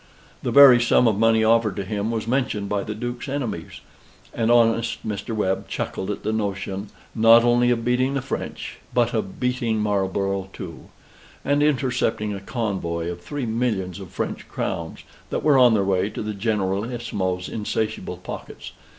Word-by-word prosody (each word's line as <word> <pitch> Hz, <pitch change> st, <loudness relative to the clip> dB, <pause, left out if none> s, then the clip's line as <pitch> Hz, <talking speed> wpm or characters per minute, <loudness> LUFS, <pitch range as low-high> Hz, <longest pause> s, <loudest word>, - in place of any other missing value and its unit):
The -, -, -2 dB
very 135 Hz, -4 st, +8 dB
sum 120 Hz, 0 st, +4 dB
of 105 Hz, -2 st, +1 dB
money 115 Hz, 0 st, +4 dB
offered 110 Hz, -3 st, +3 dB
to 100 Hz, -, -3 dB
him 105 Hz, +2 st, -2 dB
was 115 Hz, -2 st, -2 dB
mentioned 115 Hz, -5 st, -1 dB
by 100 Hz, 0 st, -1 dB
the 105 Hz, -, -5 dB
Duke's 120 Hz, +3 st, -5 dB
enemies; 120 Hz, -, -4 dB, 0.5 s
and 115 Hz, 0 st, 0 dB
honest 115 Hz, -1 st, +2 dB
Mr. 110 Hz, +2 st, -3 dB
Webb 95 Hz, -3 st, -1 dB
chuckled 95 Hz, -, -4 dB
at 105 Hz, -, -4 dB
the 110 Hz, -, -1 dB
notion, 100 Hz, -1 st, -3 dB, 0.3 s
not 115 Hz, +1 st, +6 dB
only 120 Hz, 0 st, +3 dB
of 115 Hz, -1 st, 0 dB
beating 130 Hz, +3 st, +1 dB
the 135 Hz, -, 0 dB
French, 135 Hz, -, -5 dB, 0.2 s
but 120 Hz, -1 st, +2 dB
of 105 Hz, -4 st, -3 dB
beating 125 Hz, -3 st, 0 dB
Marlborough 100 Hz, -2 st, -1 dB
too, 85 Hz, -4 st, -9 dB, 0.6 s
and 145 Hz, +1 st, +2 dB
intercepting 125 Hz, -7 st, +1 dB
a 100 Hz, -, -5 dB
convoy 95 Hz, -6 st, -3 dB
of 85 Hz, 0 st, -8 dB
three 140 Hz, +8 st, -4 dB
millions 110 Hz, -6 st, -1 dB
of 95 Hz, -3 st, -9 dB
French -, -, -4 dB
crowns, 85 Hz, -1 st, -4 dB, 0.3 s
that -, -, -2 dB
were 145 Hz, -3 st, +5 dB
on 120 Hz, -3 st, +6 dB
their 100 Hz, -, +2 dB
way 95 Hz, +1 st, +1 dB
to -, -, -5 dB
the 105 Hz, 0 st, -3 dB
Generalissimo's 100 Hz, -2 st, -2 dB
insatiable 110 Hz, -3 st, -3 dB
pockets. 90 Hz, -, -8 dB
110 Hz, 165 wpm, -23 LUFS, 100-120 Hz, 0.6 s, very